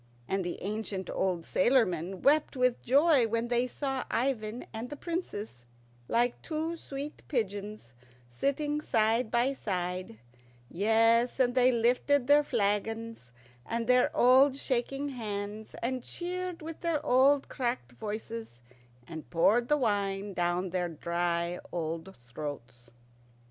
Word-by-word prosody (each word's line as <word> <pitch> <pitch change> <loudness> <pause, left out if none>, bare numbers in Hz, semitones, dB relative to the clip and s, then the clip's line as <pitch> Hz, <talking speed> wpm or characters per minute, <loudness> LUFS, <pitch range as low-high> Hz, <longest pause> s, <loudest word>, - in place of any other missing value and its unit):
And 195 0 -1
the 175 - -4
ancient 200 -2 -4
old 180 -3 -1
sailormen 185 -6 +1
wept 295 +1 +3
with 250 -1 +2
joy 280 -1 +4
when 230 +1 -1
they 245 +1 +2
saw 270 0 -3
Ivan 230 -2 -1
and 225 +3 -5
the 295 - -6
Princess, 250 - -5 0.4
like 240 +1 +1
two 320 +1 -3
sweet 285 -2 -7
pigeons, 205 - -3 0.3
sitting 290 - -1
side 225 -2 +2
by 245 +4 +2
side; 180 - -3 0.5
yes, 225 +6 +3
and 245 -1 +3
they 255 0 +5
lifted 250 +3 +2
their 290 +2 +5
flagons 225 - -1 0.4
with 230 0 -1
their 250 +1 +4
old 260 +2 +6
shaking 275 +2 -1
hands, 215 -3 -5
and 255 +1 -1
cheered 360 +2 -4
with 320 0 -7
their 325 -4 -1
old 270 +2 +4
cracked 235 - -3
voices, 215 - -6 0.5
and 160 -2 -8
poured 220 +8 +3
the 295 - +3
wine 200 -4 -1
down 175 +1 -1
their 180 -1 -1
dry 170 +1 -1
old 165 +1 -4
throats. 125 -3 -8
230 Hz, 130 wpm, -30 LUFS, 190-265 Hz, 0.5 s, old